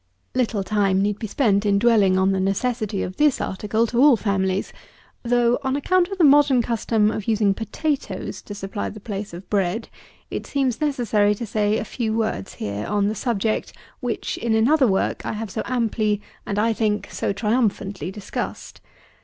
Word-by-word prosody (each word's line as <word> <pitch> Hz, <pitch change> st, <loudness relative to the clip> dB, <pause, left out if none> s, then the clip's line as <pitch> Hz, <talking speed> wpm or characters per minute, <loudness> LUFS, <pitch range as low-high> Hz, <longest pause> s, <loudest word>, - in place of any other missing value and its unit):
77. 255 Hz, -, -1 dB
Little 215 Hz, -4 st, -2 dB
time 195 Hz, -1 st, +1 dB
need 205 Hz, 0 st, -1 dB
be 220 Hz, -, -4 dB
spent 210 Hz, -3 st, +2 dB
in 200 Hz, -1 st, +3 dB
dwelling 200 Hz, -4 st, +4 dB
on 190 Hz, +1 st, +3 dB
the 190 Hz, -, 0 dB
necessity 200 Hz, +1 st, -1 dB
of 185 Hz, -, -6 dB
this 295 Hz, -3 st, +3 dB
article 210 Hz, +4 st, 0 dB
to 235 Hz, +2 st, 0 dB
all 280 Hz, -4 st, +7 dB
families; 195 Hz, -2 st, -1 dB, 0.5 s
though, 240 Hz, 0 st, +2 dB
on 265 Hz, -1 st, -1 dB
account 355 Hz, +5 st, +2 dB
of 390 Hz, 0 st, -6 dB
the 355 Hz, -, +3 dB
modern 285 Hz, -4 st, +5 dB
custom 220 Hz, -2 st, +1 dB
of 215 Hz, -2 st, -5 dB
using 215 Hz, -3 st, +3 dB
potatoes 280 Hz, +7 st, -3 dB
to 205 Hz, -, -8 dB
supply 200 Hz, +1 st, -4 dB
the 215 Hz, -, -9 dB
place 205 Hz, -1 st, -5 dB
of 175 Hz, +3 st, -10 dB
bread, 200 Hz, +2 st, -1 dB, 0.4 s
it -, -, -4 dB
seems 270 Hz, -3 st, -1 dB
necessary 225 Hz, -8 st, +2 dB
to 235 Hz, -, -5 dB
say 210 Hz, 0 st, +1 dB
a -, -, -3 dB
few 225 Hz, -1 st, -2 dB
words 215 Hz, -, -2 dB
here 100 Hz, 0 st, -4 dB
on 205 Hz, 0 st, +1 dB
the -, -, -1 dB
subject, 220 Hz, -1 st, -1 dB, 0.3 s
which, 245 Hz, -3 st, -3 dB
in 225 Hz, -1 st, +1 dB
another 260 Hz, +5 st, +4 dB
work 190 Hz, -2 st, 0 dB
I -, -, -3 dB
have 215 Hz, -1 st, -5 dB
so -, -, -2 dB
amply, 220 Hz, -4 st, 0 dB, 0.3 s
and, 200 Hz, -, -2 dB
I 225 Hz, +2 st, +2 dB
think, 215 Hz, -1 st, -1 dB
so -, -, -1 dB
triumphantly 205 Hz, -, -1 dB
discussed. 195 Hz, +1 st, -6 dB
215 Hz, 185 wpm, -23 LUFS, 200-240 Hz, 0.5 s, all